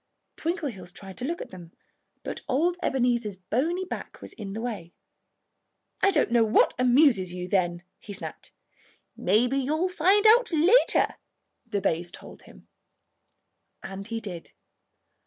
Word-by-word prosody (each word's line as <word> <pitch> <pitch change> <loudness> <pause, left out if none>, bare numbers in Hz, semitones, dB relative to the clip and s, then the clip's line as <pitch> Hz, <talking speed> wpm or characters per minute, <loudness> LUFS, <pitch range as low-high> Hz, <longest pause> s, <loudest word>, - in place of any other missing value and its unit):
Twinkleheels 285 - -4
tried 190 +1 -10
to 250 - -3
look 335 +4 -3
at - - -15
them; 175 -2 -12 0.5
but - - -5
old 335 +7 +2
Ebenezer's 240 - 0
bony 285 - -1
back - - -7
was - - -8
in 200 -3 -7
the 220 - -4
way. 205 -8 -5 1.1
"I 390 - +5
don't 300 -10 +1
know 235 -1 +5
what 220 0 +3
amuses 245 - +4
you, 180 0 -5
then," 175 -2 0 0.2
he 210 - -10
snapped. 200 - -8 0.6
"Maybe 240 +8 +2
you'll 310 +7 0
find 380 +4 +3
out 455 +1 +6
later," 345 +10 +4 0.5
the 200 - -2
bays 170 0 -1
told - - -12
him. - - -17 1.2
And 195 +1 -7
he 230 0 -3
did. 185 -6 -8
235 Hz, 140 wpm, -26 LUFS, 190-315 Hz, 1.2 s, out